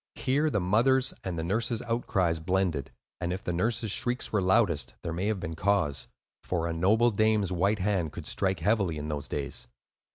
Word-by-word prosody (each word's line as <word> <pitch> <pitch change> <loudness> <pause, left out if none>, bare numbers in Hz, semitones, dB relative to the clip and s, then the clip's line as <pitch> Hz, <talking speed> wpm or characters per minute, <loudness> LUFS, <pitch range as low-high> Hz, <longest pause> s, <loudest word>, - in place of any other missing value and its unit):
Here 145 +4 +1
the 105 - 0
mother's 125 +8 +3
and 90 -3 -3
the 80 - -2
nurse's 115 +6 0
outcries 95 -8 0
blended; 90 -4 0 0.3
and 85 0 -2
if 95 +2 -4
the 90 - -2
nurse's 110 +4 0
shrieks 120 +3 -2
were 105 - +3
loudest, 95 -5 +2
there 85 - -3
may 90 +5 -1
have 110 -3 0
been 90 -3 -5
cause; 95 -6 +1 0.4
for 85 -2 -1
a 85 - -1
noble 110 +8 +3
dame's 110 -2 +2
white 100 +4 +2
hand 95 -5 0
could - - -8
strike 95 -3 -1
heavily, 100 -4 +1
in 75 +1 -5
those 75 -1 -3
days. 70 -3 -4
95 Hz, 190 wpm, -28 LUFS, 85-110 Hz, 0.4 s, mother's